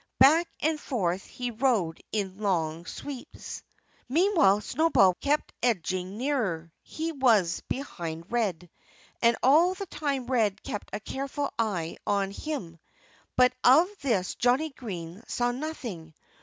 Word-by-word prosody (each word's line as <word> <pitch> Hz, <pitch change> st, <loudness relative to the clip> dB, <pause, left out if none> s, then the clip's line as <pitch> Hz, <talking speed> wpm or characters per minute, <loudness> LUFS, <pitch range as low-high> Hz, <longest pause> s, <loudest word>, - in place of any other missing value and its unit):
Back 320 Hz, +6 st, +6 dB
and 310 Hz, 0 st, +1 dB
forth 195 Hz, -, -1 dB
he 245 Hz, -1 st, -4 dB
rode 225 Hz, -9 st, +1 dB
in 195 Hz, -2 st, -2 dB
long 170 Hz, -5 st, -1 dB
sweeps. 280 Hz, -4 st, -7 dB, 0.5 s
Meanwhile 310 Hz, -, +4 dB
Snowball 250 Hz, -, +4 dB
kept 295 Hz, +1 st, 0 dB
edging 185 Hz, -4 st, -1 dB
nearer. 215 Hz, -, -1 dB
He 325 Hz, +1 st, -4 dB
was 225 Hz, -, +3 dB
behind 170 Hz, -, -5 dB
Red. 190 Hz, -8 st, -1 dB, 0.5 s
And 235 Hz, 0 st, +4 dB
all 330 Hz, +8 st, +5 dB
the 395 Hz, -, -5 dB
time 285 Hz, -7 st, -2 dB
Red 225 Hz, -6 st, +1 dB
kept 210 Hz, -, -5 dB
a -, -, -3 dB
careful 275 Hz, +5 st, -3 dB
eye 180 Hz, -8 st, -1 dB
on 200 Hz, -2 st, +1 dB
him. 200 Hz, -, -5 dB, 0.6 s
But 250 Hz, 0 st, +5 dB
of 295 Hz, +8 st, +7 dB
this 215 Hz, -9 st, 0 dB
Johnnie 260 Hz, +6 st, +2 dB
Green 185 Hz, -7 st, -7 dB
saw 245 Hz, 0 st, 0 dB
nothing. 240 Hz, -, -6 dB
235 Hz, 130 wpm, -28 LUFS, 185-280 Hz, 0.6 s, of